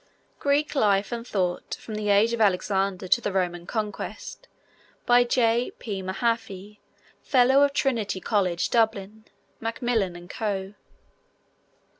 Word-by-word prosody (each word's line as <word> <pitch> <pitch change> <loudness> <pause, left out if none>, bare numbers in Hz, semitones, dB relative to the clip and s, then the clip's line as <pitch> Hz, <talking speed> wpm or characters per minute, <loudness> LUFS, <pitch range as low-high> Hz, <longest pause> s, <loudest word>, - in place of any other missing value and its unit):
Greek 290 +1 +1
Life 205 -7 +2
and 235 0 -5
Thought: 180 -5 -2
from 220 - -9
the 210 -1 -2
Age 205 +3 +4
of 235 - -1
Alexander 195 -1 +1
to 240 - +3
the 205 - -2
Roman 175 -2 -2
Conquest. 220 - -5 0.6
By 245 0 +5
J. 240 0 +1
P. 200 -4 -5
Mahaffy, 205 0 -3 0.4
Fellow 265 +1 +4
of 285 0 +4
Trinity 230 -9 -1
College, 185 -4 0
Dublin. 220 -2 0 0.3
(Macmillan 225 -4 -1
and 175 0 -11
Co.) 195 -1 -3
210 Hz, 125 wpm, -25 LUFS, 195-235 Hz, 0.6 s, By